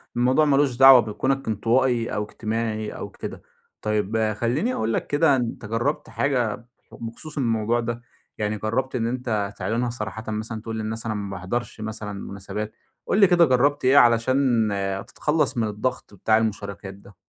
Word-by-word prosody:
الموضوع 130 +5 +3
مالوش 140 -3 +3
دعوة 135 0 +9
بكونك 130 +5 -1
انطوائي 115 +2 +1
أو 105 - -1
اجتماعي 110 0 -3
أو - - -7
كده. - - -8 0.4
طيّب 110 +1 0
خليني 135 - 0
أقولك 110 - -1
كده 145 -1 +3
أنتَ 120 -4 -3
جرَّبت 115 +7 -2
حاجة 120 -6 -1 0.3
بخصوص 115 +7 -8
الموضوع؟ 115 -2 +1
ده 120 0 -3 0.4
يعني 105 0 -1
جربت 120 +6 -2
إن 115 -2 0
أنت 115 -5 -2
تعلِنها 120 +2 -1
صراحةً 110 -2 -5
مثلًا 110 +1 -4
تقول 115 0 -5
للناس 110 +1 -4
انا 110 -2 -1
ما 100 -1 -4
باحضرش 95 +5 -4
مثلًا 110 -1 -5
مناسبات؟ 100 +2 -6 0.3
قُل - - +1
لي 200 - +8
كده 175 -1 +5
جربت 140 +1 +2
إيه 130 +2 +5
علشان 120 -1 +4
آآ، 100 -1 -2
تتخلص 150 +5 -1
من 115 -2 +1
الضغط 105 +3 -3
بتاع 110 +2 +2
المشاركات 100 -3 -3
ده؟ 100 0 -17
115 Hz, 160 wpm, -24 LUFS, 105-130 Hz, 0.4 s, دعوة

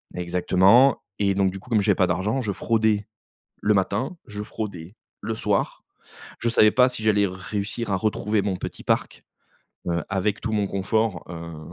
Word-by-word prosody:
exactement 95 +8 +4 0.2
et 100 -1 +2
donc 95 -1 +2
du 95 - -7
coup, 125 - -17
comme 110 -3 +3
j'avais - - +3
pas 95 - +3
d'argent, 95 +9 0
je 105 -5 -2
fraudais 110 -1 +1 0.5
le 105 - +2
matin, 100 - 0
je 105 0 -6
fraudais 100 -5 -6 0.3
le 115 - -3
soir, - - -1 0.6
je 120 - 0
savais 110 -2 +5
pas 125 +3 +5
si 125 -3 -6
j'allais 105 -2 +3
réussir 100 +4 -4
à 95 - +2
retrouver 105 +1 0
mon 95 -2 -1
petit - - -7
parc, - - -1 0.6
heu, 85 0 0
avec 100 +2 -1
tout 110 - -3
mon 105 -2 0
confort, 100 -1 -1
heu, 85 -2 -8
100 Hz, 175 wpm, -24 LUFS, 95-110 Hz, 0.6 s, savais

